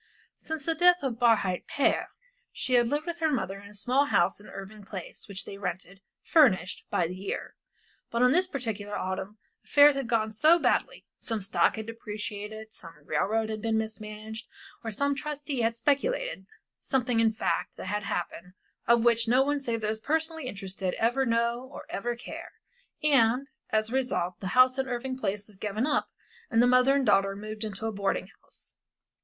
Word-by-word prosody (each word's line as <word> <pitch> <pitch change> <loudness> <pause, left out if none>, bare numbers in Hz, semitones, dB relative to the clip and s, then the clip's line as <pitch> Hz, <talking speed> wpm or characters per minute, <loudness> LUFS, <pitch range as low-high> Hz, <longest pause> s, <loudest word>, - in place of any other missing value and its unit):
Since 315 -3 -4
the 330 - +1
death 355 +2 +5
of 245 -4 -2
Barhyte 215 -6 +2
père 285 - +1 0.4
she 255 - -3
had 240 -1 +5
lived 295 +5 -1
with 345 -1 -4
her 320 -1 +2
mother 200 -8 -2
in 200 0 -12
a - - -15
small 255 +7 +2
house 190 -10 +2
in 210 - -14
Irving 200 +2 -9
Place, 190 -3 -8
which 200 -1 -4
they 200 - -8
rented, 185 0 -5 0.2
furnished, 240 - +3
by 175 - +1
the 180 +2 -5
year. 195 +1 -5 0.6
But 235 +1 +1
on 250 - +6
this 365 +5 +3
particular 220 - -4
autumn 190 +3 -4 0.3
affairs 290 0 +6
had 275 -3 -2
gone 220 -2 +1
so 310 +10 +5
badly, - - 0
some 225 -2 -2
stock 195 +1 +2
had 220 -1 -5
depreciated, 215 -1 -6
some 165 -1 -8
railroad 220 +1 0
had 215 -1 -4
been 225 0 +1
mismanaged, 220 0 -5 0.4
or 225 - -3
some 280 +7 0
trustee 290 -2 -3
had 230 0 +1
speculated 290 - 0 0.3
something, 250 -3 0
in 225 -1 +4
fact, 220 - -2
had 210 0 -2
happened 180 -2 -4 0.3
of 235 0 +4
which 230 -1 +4
no 250 +3 +5
one 290 +1 0
save 235 -4 -2
those 215 +1 -1
personally 320 0 -1
interested 195 -4 -4
ever 250 +4 +1
know 235 +2 0
or - - -9
ever 240 +4 -2
care, 235 - -9 0.5
and, 270 -1 +3 0.2
as 215 +1 +1
a - - -5
result, 215 -9 -1
the 190 - -4
house 255 +1 +6
in 265 - 0
Irving 255 +1 -3
Place 205 -5 -2
was 210 -3 -13
given 210 +4 -1
up, 300 - 0 0.4
and 225 - +2
the 240 - +6
mother 255 +2 +5
and 275 -2 +2
daughter 195 -3 +3
moved 215 +2 -6
into 215 0 -4
a 225 - 0
boarding 200 -1 -1
house. - - -14
225 Hz, 185 wpm, -28 LUFS, 205-265 Hz, 0.6 s, on